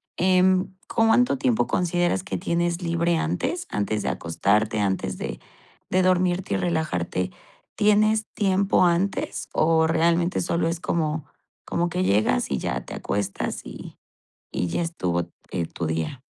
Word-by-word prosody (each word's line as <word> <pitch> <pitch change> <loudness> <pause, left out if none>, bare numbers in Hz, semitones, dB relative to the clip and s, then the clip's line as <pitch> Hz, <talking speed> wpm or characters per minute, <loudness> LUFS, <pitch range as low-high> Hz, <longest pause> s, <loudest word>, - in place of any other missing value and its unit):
em, 185 +1 +3 0.2
¿cuánto 225 - +4
tiempo 120 -2 +1
consideras 175 +1 +1
que - - -3
tienes 175 -1 -1
libre 170 0 +1
antes?, 175 - -1
antes 105 +1 -1
de - - -1
acostarte, 105 +6 0
antes 95 -2 -1
de - - -5 0.5
dormirte 185 0 +2
y - - +2
relajarte, 125 - -1 0.4
¿tienes 215 +1 +3
tiempo 195 -2 +2
antes 175 +3 0
o 160 0 +3
realmente 170 +2 +2
solo 170 -1 0
es 165 0 -2
como 155 -3 -1 0.4
como 175 0 0
que 180 +2 -1
llegas 100 -11 +2
y - - -1
ya - - -3
te - - -8
acuestas 100 -1 -3
y - - -10 0.5
y - - -1
ya 170 - -1
estuvo, 90 - -2 0.2
eh, 85 -3 -1
tu 85 0 -5
día? 80 - -3
170 Hz, 140 wpm, -24 LUFS, 110-185 Hz, 0.5 s, cuánto